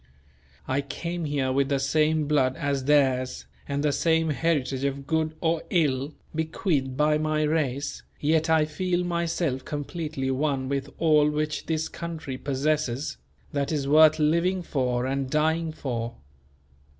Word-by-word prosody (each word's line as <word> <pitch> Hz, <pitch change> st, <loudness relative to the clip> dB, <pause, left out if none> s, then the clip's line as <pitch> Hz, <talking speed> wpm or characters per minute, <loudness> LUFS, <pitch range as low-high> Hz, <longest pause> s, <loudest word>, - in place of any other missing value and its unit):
I 130 Hz, +2 st, +1 dB
came 170 Hz, +4 st, -4 dB
here 140 Hz, -3 st, 0 dB
with 135 Hz, +1 st, +1 dB
the 140 Hz, -, +2 dB
same 155 Hz, +3 st, +2 dB
blood 135 Hz, -4 st, +2 dB
as 140 Hz, -2 st, -1 dB
theirs 130 Hz, -, +2 dB, 0.2 s
and 140 Hz, +1 st, -1 dB
the 150 Hz, -, +3 dB
same 160 Hz, +2 st, +2 dB
heritage 140 Hz, -4 st, 0 dB
of 140 Hz, 0 st, -2 dB
good 160 Hz, +1 st, 0 dB
or 165 Hz, -1 st, +1 dB
ill, 145 Hz, -4 st, +1 dB, 0.2 s
bequeathed 155 Hz, -4 st, -1 dB
by 150 Hz, +1 st, +3 dB
my 155 Hz, 0 st, 0 dB
race; 145 Hz, -3 st, -1 dB, 0.2 s
yet 160 Hz, +2 st, +2 dB
I 160 Hz, -1 st, +4 dB
feel 175 Hz, +4 st, -1 dB
myself 170 Hz, -5 st, -1 dB
completely 145 Hz, -2 st, -3 dB
one 135 Hz, -1 st, 0 dB
with 140 Hz, 0 st, -2 dB
all 150 Hz, -2 st, +4 dB
which 150 Hz, 0 st, -2 dB
this 160 Hz, -1 st, 0 dB
country 160 Hz, -6 st, -6 dB
possesses, 140 Hz, -, -1 dB, 0.4 s
that 140 Hz, 0 st, -1 dB
is 145 Hz, -3 st, -1 dB
worth 155 Hz, +1 st, +6 dB
living 170 Hz, +4 st, +2 dB
for 125 Hz, -5 st, -1 dB
and 135 Hz, 0 st, -1 dB
dying 160 Hz, +3 st, +1 dB
for. 120 Hz, -6 st, -4 dB
150 Hz, 145 wpm, -26 LUFS, 135-160 Hz, 0.4 s, worth